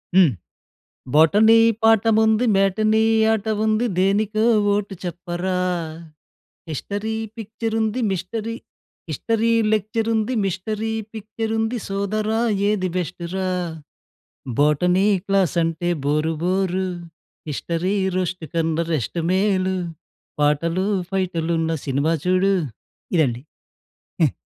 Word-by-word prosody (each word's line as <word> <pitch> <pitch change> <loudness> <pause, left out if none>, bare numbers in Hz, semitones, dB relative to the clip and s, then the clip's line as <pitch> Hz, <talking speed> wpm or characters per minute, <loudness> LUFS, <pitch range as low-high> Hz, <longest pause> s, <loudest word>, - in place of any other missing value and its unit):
హ్మ్ 180 -7 +6 0.8
botany 210 +9 +6 0.3
పాఠముంది 220 +1 +4
matinee 215 +3 +2 0.3
ఆట 215 0 -2 0.2
ఉంది 215 +2 +2
దేనికో 210 +3 +2 0.3
ఓటు 205 -1 -2
చెప్పరా, 175 +1 -3 1.1
హిస్టరీ 205 +8 -3 0.2
పిక్చర్ 220 +1 -4
ఉంది 220 +3 0
మిస్టరీ 215 +5 -3 0.5
హిస్టరీ 230 0 0 0.2
లెక్చర్ 215 +2 -1
ఉంది 220 +3 0
మిస్టరీ 215 +4 -2 0.2
పిక్చర్ 220 +1 -5
ఉంది 225 +2 -1
సోదరా 210 +3 -1 0.3
ఏది 185 -3 0
బెస్టు 175 -1 -4
రా, 190 -1 -1 1.1
బోటనీ 180 +6 +3 0.2
క్లాస్ 195 -3 +1
అంటే 165 +1 -1 0.2
బోరు 155 +2 +1
బోరు, 185 0 0 0.6
హిస్టరీ 170 +6 -2 0.2
రోస్ట్ 185 -2 -2
కన్న 165 -1 0 0.2
రెస్ట్ 155 +4 -2
మేలు, 190 -1 +1 0.6
పాటలు 165 +6 +1 0.2
ఫైటులున్న 170 -3 -1
సినిమా 140 +4 +1
చూడు. 185 +2 +3 0.6
ఇదండి 130 -5 +1 0.8
హ్మ్. - - +3
190 Hz, 95 wpm, -22 LUFS, 175-215 Hz, 1.1 s, హ్మ్